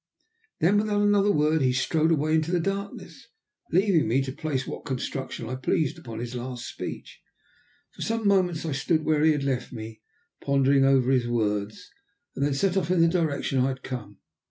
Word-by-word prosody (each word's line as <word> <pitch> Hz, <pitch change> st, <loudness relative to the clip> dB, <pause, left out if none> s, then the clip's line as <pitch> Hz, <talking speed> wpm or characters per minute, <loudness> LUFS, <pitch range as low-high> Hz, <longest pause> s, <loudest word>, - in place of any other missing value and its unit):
Then, 195 Hz, +5 st, +4 dB
without 205 Hz, -1 st, +1 dB
another 205 Hz, 0 st, +4 dB
word, 155 Hz, -1 st, +2 dB
he 130 Hz, -1 st, +3 dB
strode 155 Hz, +5 st, +1 dB
away 155 Hz, 0 st, +1 dB
into 160 Hz, 0 st, +1 dB
the 180 Hz, -, +2 dB
darkness, 195 Hz, +3 st, -5 dB, 0.4 s
leaving 185 Hz, -, +3 dB
me 130 Hz, +5 st, +2 dB
to 135 Hz, -, -4 dB
place 135 Hz, -2 st, -3 dB
what -, -, -7 dB
construction 130 Hz, -3 st, -4 dB
I 125 Hz, -, -4 dB
pleased 150 Hz, +5 st, -1 dB
upon 115 Hz, -7 st, -8 dB
his 120 Hz, +1 st, -5 dB
last 125 Hz, 0 st, -5 dB
speech. -, -, -7 dB, 0.7 s
For -, -, -13 dB
some 225 Hz, -1 st, -1 dB
moments 180 Hz, -5 st, +2 dB
I 160 Hz, -, -2 dB
stood 155 Hz, +4 st, 0 dB
where 155 Hz, -1 st, +2 dB
he 160 Hz, -, +6 dB
had 145 Hz, -2 st, -1 dB
left 130 Hz, -3 st, -2 dB
me, 110 Hz, -1 st, -8 dB, 0.4 s
pondering 140 Hz, 0 st, +3 dB
over 135 Hz, -1 st, +3 dB
his 125 Hz, -3 st, +2 dB
words, 105 Hz, -3 st, -2 dB, 0.4 s
and 140 Hz, -, -1 dB
then 145 Hz, -1 st, +1 dB
set 185 Hz, +6 st, +1 dB
off 175 Hz, -4 st, 0 dB
in 180 Hz, -2 st, +3 dB
the 165 Hz, -, +6 dB
direction 160 Hz, -6 st, 0 dB
I 130 Hz, -, +3 dB
had 135 Hz, 0 st, -4 dB
come. 110 Hz, -6 st, -7 dB
140 Hz, 190 wpm, -26 LUFS, 130-165 Hz, 0.7 s, he